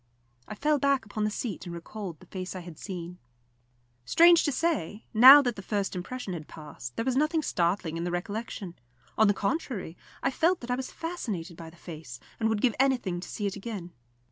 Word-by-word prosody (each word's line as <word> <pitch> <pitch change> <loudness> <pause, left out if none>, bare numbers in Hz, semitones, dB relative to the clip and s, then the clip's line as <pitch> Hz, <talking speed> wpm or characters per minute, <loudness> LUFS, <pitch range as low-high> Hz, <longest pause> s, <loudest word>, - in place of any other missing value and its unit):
I - - -6
fell 300 +4 +2
back 275 -3 +2
upon 210 0 -2
the - - +1
seat 210 -3 -4
and 170 - -5
recalled 170 -1 -7
the - - -16
face 185 0 -6
I 185 - -5
had 170 -3 -11
seen. 180 -2 -7 0.8
Strange 340 - +6
to 290 - +2
say, 250 - -1
now 265 +6 +10
that 245 -3 -1
the 195 - -7
first 200 -1 -2
impression 195 +3 -5
had 155 -3 -6
passed, 150 -6 -9
there 230 - -2
was 260 -1 +1
nothing 305 +3 +2
startling 170 - 0
in 165 - -3
the 175 - -1
recollection; 200 0 -4 0.4
on 220 - +5
the 205 - +3
contrary, 200 - -2 0.3
I - - +2
felt 335 +6 +2
that 245 0 -5
I - - +2
was 260 0 -5
fascinated 215 - -5
by 165 0 -9
the 165 - -18
face, 155 -9 -9 0.2
and 220 -1 +2
would 220 -2 0
give 245 -3 +3
anything 245 -10 +1
to 180 - -8
see 210 - -4
it 200 - -1
again. 200 -4 -6
205 Hz, 210 wpm, -28 LUFS, 175-255 Hz, 0.8 s, now